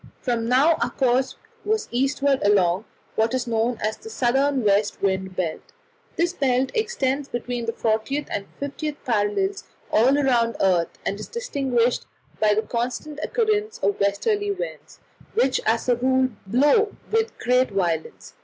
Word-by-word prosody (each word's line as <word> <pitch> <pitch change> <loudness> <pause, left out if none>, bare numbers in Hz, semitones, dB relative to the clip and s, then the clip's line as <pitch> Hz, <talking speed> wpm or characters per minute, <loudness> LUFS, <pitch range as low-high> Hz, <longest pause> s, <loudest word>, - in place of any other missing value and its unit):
From 235 -2 -1
now 285 +6 +4
our - - +1
course 260 0 +1 0.3
was 435 0 0
eastward 275 +2 +1
along 200 -1 +3 0.3
what 225 +3 +1
is 255 - -1
known 230 0 0
as 215 +1 -1
the 445 - -11
southern 270 - +1
west 205 0 +2
wind 190 -1 -1
belt. 170 -4 -2 0.5
This 345 +1 +1
belt 260 -4 +1
extends 290 - -1
between 240 -1 -4
the - - +1
40th 230 +6 -1
and 200 - -3
50th 285 +2 -4
parallels 235 - 0 0.3
all 235 +5 +5
round 250 -5 +2
the - - +1
earth, 175 -3 +1
and 200 - -2
is 215 - -6
distinguished 265 - 0 0.3
by 210 -1 +3
the 215 - +1
constant 250 +5 -3
occurrence 435 +1 0
of 405 - +1
westerly 410 - +1
winds, 400 +5 -6 0.4
which 270 - +2
as 225 +2 +1
a 245 - +4
rule 260 +1 +2 0.2
blow 295 - +3 0.2
with 450 +1 0
great 250 +1 +2
violence. 175 -5 -2
250 Hz, 155 wpm, -23 LUFS, 220-290 Hz, 0.5 s, all